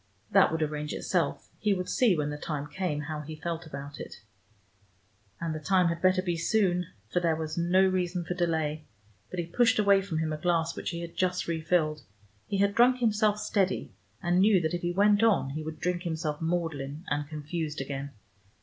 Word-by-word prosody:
That -, -, +5 dB
would 160 Hz, -1 st, 0 dB
arrange 150 Hz, 0 st, -3 dB
itself: 170 Hz, -6 st, -1 dB
he 210 Hz, -2 st, +2 dB
would 180 Hz, -1 st, -3 dB
see, 235 Hz, -, +3 dB
when 150 Hz, -1 st, -1 dB
the -, -, -4 dB
time 145 Hz, -2 st, -3 dB
came, 150 Hz, -1 st, -2 dB
how 150 Hz, 0 st, -4 dB
he 155 Hz, +1 st, -7 dB
felt 165 Hz, +1 st, -4 dB
about 140 Hz, -1 st, -8 dB
it. -, -, -8 dB, 1.2 s
And 165 Hz, -1 st, -2 dB
the 155 Hz, -, -4 dB
time 180 Hz, +2 st, +3 dB
had 170 Hz, 0 st, -3 dB
better 185 Hz, 0 st, +3 dB
be 175 Hz, -2 st, -1 dB
soon, 180 Hz, 0 st, +1 dB, 0.2 s
for -, -, +2 dB
there 165 Hz, -2 st, +1 dB
was 155 Hz, -1 st, -4 dB
no 175 Hz, +3 st, +3 dB
reason 180 Hz, -2 st, 0 dB
for 180 Hz, -, -2 dB
delay. 160 Hz, -3 st, -1 dB, 0.4 s
But 185 Hz, -, -7 dB
he 170 Hz, -, -1 dB
pushed 230 Hz, +8 st, +3 dB
away 200 Hz, -2 st, +5 dB
from 190 Hz, -5 st, -4 dB
him 155 Hz, -1 st, -1 dB
a -, -, -3 dB
glass 165 Hz, -1 st, +1 dB
which -, -, -4 dB
he 170 Hz, -, -4 dB
had 170 Hz, -1 st, -7 dB
just 180 Hz, -1 st, 0 dB
refilled: 160 Hz, -2 st, 0 dB, 0.5 s
he 200 Hz, -, -1 dB
had 200 Hz, +1 st, +2 dB
drunk 245 Hz, +3 st, +5 dB
himself 215 Hz, -3 st, +2 dB
steady, 195 Hz, -, 0 dB, 0.3 s
and 175 Hz, +1 st, +2 dB
knew 200 Hz, -1 st, +5 dB
that 160 Hz, +1 st, -1 dB
if 175 Hz, -, -2 dB
he 175 Hz, -, -1 dB
went 205 Hz, +3 st, +4 dB
on 215 Hz, -11 st, +3 dB
he 155 Hz, +3 st, -4 dB
would 155 Hz, 0 st, -6 dB
drink 180 Hz, -1 st, -1 dB
himself 160 Hz, -3 st, -3 dB
maudlin 160 Hz, -2 st, -2 dB
and 145 Hz, 0 st, -2 dB
confused 155 Hz, 0 st, -4 dB
again. 140 Hz, +1 st, -4 dB
170 Hz, 205 wpm, -29 LUFS, 155-185 Hz, 1.2 s, That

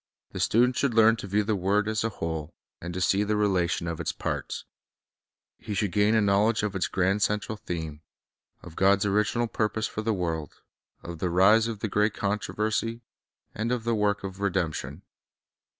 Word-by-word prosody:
The -, -, -6 dB
student 125 Hz, +3 st, +3 dB
should 135 Hz, -5 st, +1 dB
learn 115 Hz, 0 st, +6 dB
to 100 Hz, -, -7 dB
view 105 Hz, +2 st, +1 dB
the 105 Hz, +1 st, 0 dB
word 100 Hz, +3 st, +1 dB
as 110 Hz, 0 st, 0 dB
a 115 Hz, -, 0 dB
whole, 80 Hz, -5 st, -5 dB, 0.3 s
and 85 Hz, -, -5 dB
to -, -, -2 dB
see 95 Hz, +3 st, +2 dB
the 105 Hz, +1 st, 0 dB
relation 95 Hz, -4 st, +1 dB
of 85 Hz, -1 st, -4 dB
its -, -, -1 dB
parts. -, -, -4 dB, 0.9 s
He 105 Hz, -, -5 dB
should 100 Hz, 0 st, 0 dB
gain 105 Hz, +4 st, +3 dB
a 110 Hz, -, +4 dB
knowledge 105 Hz, +2 st, +2 dB
of 105 Hz, -2 st, -2 dB
its 95 Hz, -, 0 dB
grand 95 Hz, +2 st, +1 dB
central 105 Hz, +2 st, 0 dB
theme, 80 Hz, -7 st, -6 dB, 0.6 s
of 85 Hz, -2 st, -11 dB
God's 100 Hz, +1 st, +3 dB
original 105 Hz, +4 st, +1 dB
purpose 110 Hz, -1 st, -1 dB
for 110 Hz, -, -4 dB
the 110 Hz, +1 st, 0 dB
world, 85 Hz, -6 st, -3 dB, 0.4 s
of 85 Hz, -1 st, -7 dB
the 90 Hz, -, -1 dB
rise 100 Hz, +6 st, +5 dB
of 110 Hz, -3 st, -5 dB
the -, -, 0 dB
great 105 Hz, +1 st, +1 dB
controversy, 110 Hz, +3 st, -2 dB, 0.5 s
and 115 Hz, +3 st, -2 dB
of 125 Hz, -2 st, -1 dB
the 115 Hz, 0 st, 0 dB
work 105 Hz, -2 st, +1 dB
of 95 Hz, 0 st, -6 dB
redemption. 90 Hz, -6 st, -2 dB
105 Hz, 185 wpm, -27 LUFS, 95-110 Hz, 0.9 s, learn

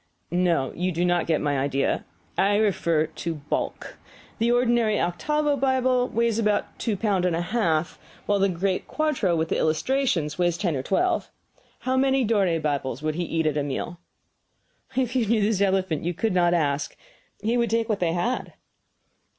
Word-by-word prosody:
"No, 175 Hz, -7 st, +1 dB
you 180 Hz, +2 st, -1 dB
do 175 Hz, +1 st, 0 dB
not 175 Hz, -1 st, +1 dB
get 160 Hz, -2 st, +1 dB
my 145 Hz, -2 st, 0 dB
idea. 135 Hz, 0 st, 0 dB, 0.3 s
I 200 Hz, +1 st, +3 dB
refer 170 Hz, -7 st, +2 dB
to 160 Hz, +1 st, -5 dB
bulk. 145 Hz, -1 st, -4 dB, 0.4 s
The 230 Hz, +1 st, +2 dB
ordinary 240 Hz, -3 st, +2 dB
octavo 295 Hz, -, 0 dB
Bible 260 Hz, -2 st, +2 dB
weighs 230 Hz, -1 st, 0 dB
about 210 Hz, -2 st, 0 dB
two 220 Hz, -4 st, -1 dB
pounds 195 Hz, -3 st, +1 dB
and 170 Hz, -, 0 dB
a 170 Hz, -, -1 dB
half, 175 Hz, -5 st, 0 dB, 0.3 s
while 205 Hz, -1 st, +1 dB
the 195 Hz, 0 st, +3 dB
great 185 Hz, +1 st, -1 dB
quarto 285 Hz, -, 0 dB
with 160 Hz, 0 st, -1 dB
the -, -, 0 dB
illustrations 165 Hz, -, 0 dB
weighs 175 Hz, -1 st, +2 dB
ten 175 Hz, -6 st, -1 dB
or 130 Hz, -, -1 dB
twelve. 345 Hz, -, 0 dB, 0.5 s
How 260 Hz, 0 st, 0 dB
many 265 Hz, 0 st, +3 dB
Dore 195 Hz, -7 st, +2 dB
Bibles 145 Hz, -2 st, -2 dB
would 155 Hz, 0 st, 0 dB
he 175 Hz, +2 st, -2 dB
eat 165 Hz, -1 st, -1 dB
at 155 Hz, -1 st, +1 dB
a 145 Hz, -, +1 dB
meal?" 155 Hz, +5 st, -4 dB, 1.0 s
"If 255 Hz, -1 st, 0 dB
you 240 Hz, -4 st, +2 dB
knew 220 Hz, 0 st, +2 dB
this 205 Hz, -1 st, +1 dB
elephant, 190 Hz, -5 st, +1 dB
you 175 Hz, +1 st, -2 dB
could 225 Hz, +2 st, 0 dB
not 175 Hz, -1 st, +3 dB
ask. 145 Hz, -3 st, -1 dB, 0.5 s
He 225 Hz, +3 st, +1 dB
would 235 Hz, -2 st, +1 dB
take 225 Hz, +1 st, +1 dB
what 215 Hz, -3 st, -1 dB
they 165 Hz, -2 st, +1 dB
had." 235 Hz, +9 st, -2 dB
185 Hz, 180 wpm, -25 LUFS, 165-230 Hz, 1.0 s, I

